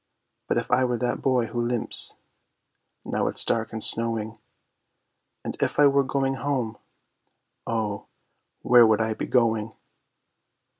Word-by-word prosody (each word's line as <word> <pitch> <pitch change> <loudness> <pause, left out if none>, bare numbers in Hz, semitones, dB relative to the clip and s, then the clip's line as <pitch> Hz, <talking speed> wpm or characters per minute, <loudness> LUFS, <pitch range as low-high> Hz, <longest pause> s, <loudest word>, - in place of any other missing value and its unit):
_If - - 0
I 130 - +3
were 125 -1 0
that 125 +1 -2
Boy 130 -3 +1
who 120 +1 -4
limps, 120 -1 0 0.9
now - - -1
it's - - +2
dark 115 -1 0
and 110 -1 -1
snowing, 115 -1 -1 1.0
And - - -5
if - - -1
I 145 - +7
were 140 0 +4
going 135 0 -1
home, 130 -6 -3 0.9
Oh, 110 -3 -3 0.6
where 120 -2 +6
would 110 -1 +2
I 110 0 0
be - - -5
going? 115 -3 +1
115 Hz, 135 wpm, -25 LUFS, 110-130 Hz, 1.0 s, I